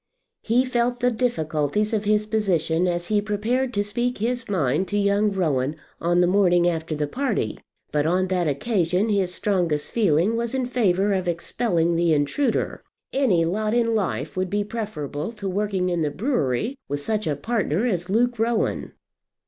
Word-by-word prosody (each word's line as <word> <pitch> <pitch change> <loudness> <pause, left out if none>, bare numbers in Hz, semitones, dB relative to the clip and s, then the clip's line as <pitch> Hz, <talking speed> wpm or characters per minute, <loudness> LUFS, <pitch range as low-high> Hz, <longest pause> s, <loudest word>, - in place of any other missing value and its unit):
He 245 +3 +2
felt 245 -1 0
the 250 0 +2
difficulties 210 - 0
of 215 -1 0
his 210 0 +2
position 185 -6 +1
as 175 0 -2
he 210 -1 +2
prepared 225 +5 -1
to 205 - +2
speak 240 +4 -1
his 240 +2 -2
mind 165 -1 +1
to 205 - -1
young 200 +1 +2
Rowan 150 -7 0 0.2
on 175 +1 +2
the - - +5
morning 175 -2 +3
after 160 -2 -1
the 150 0 -1
party; 220 - -2 0.3
but 150 +1 +1
on 185 +3 +2
that 180 -3 +1
occasion 180 - 0
his 195 -3 +1
strongest 175 -7 0
feeling 200 -1 +2
was 235 +2 -1
in 260 -1 0
favour 205 -5 +1
of 185 -2 -1
expelling 170 0 0
the 170 -1 +3
intruder. 220 - 0 0.3
Any 215 -12 +3
lot 215 +6 0
in 230 -1 +2
life 210 -5 -2
would 185 0 -1
be 205 +2 0
preferable 200 -8 -4
to 210 -3 -6
working 190 -1 -1
in 175 -2 0
the 150 - +1
brewery 225 - -1
with 145 - -1
such 215 +5 -1
a 150 - 0
partner 205 - -1
as 180 -6 -1
Luke 240 +3 +1
Rowan. 230 0 0
200 Hz, 175 wpm, -24 LUFS, 170-225 Hz, 0.3 s, the